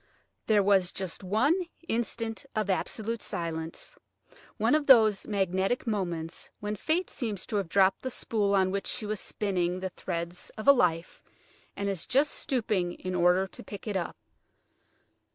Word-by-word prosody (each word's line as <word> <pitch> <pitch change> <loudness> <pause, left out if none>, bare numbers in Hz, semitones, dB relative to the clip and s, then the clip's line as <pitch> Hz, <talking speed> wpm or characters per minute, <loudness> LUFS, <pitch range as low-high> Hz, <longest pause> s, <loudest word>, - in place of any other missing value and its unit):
There 210 -2 +4
was 195 -2 +3
just 190 0 -4
one 220 - +3 0.3
instant 225 0 -2
of 215 -2 +1
absolute 220 +4 -2
silence, 165 -1 -5 0.6
one - - +2
of 305 -1 +2
those 220 -6 +6
magnetic 195 +3 0
moments 175 -7 -3
when 210 0 -3
Fate 325 - 0
seems 210 -7 -4
to 210 - -2
have 195 -4 -2
dropped 195 +1 +4
the 260 - -3
spool 210 -5 0
on 190 -1 +3
which 200 0 -2
she 230 - -2
was 210 -1 -2
spinning 180 -3 -1
the 190 0 -3
threads 170 0 -5
of 215 - -6
a 280 - +10
life, 175 -9 0 0.5
and 200 - -2
is 190 -4 -3
just 280 +3 +3
stooping 215 - 0
in 185 0 -5
order 180 +1 +4
to - - -10
pick 200 - -9
it 205 - -2
up. 180 -3 -2
200 Hz, 160 wpm, -29 LUFS, 180-220 Hz, 0.6 s, a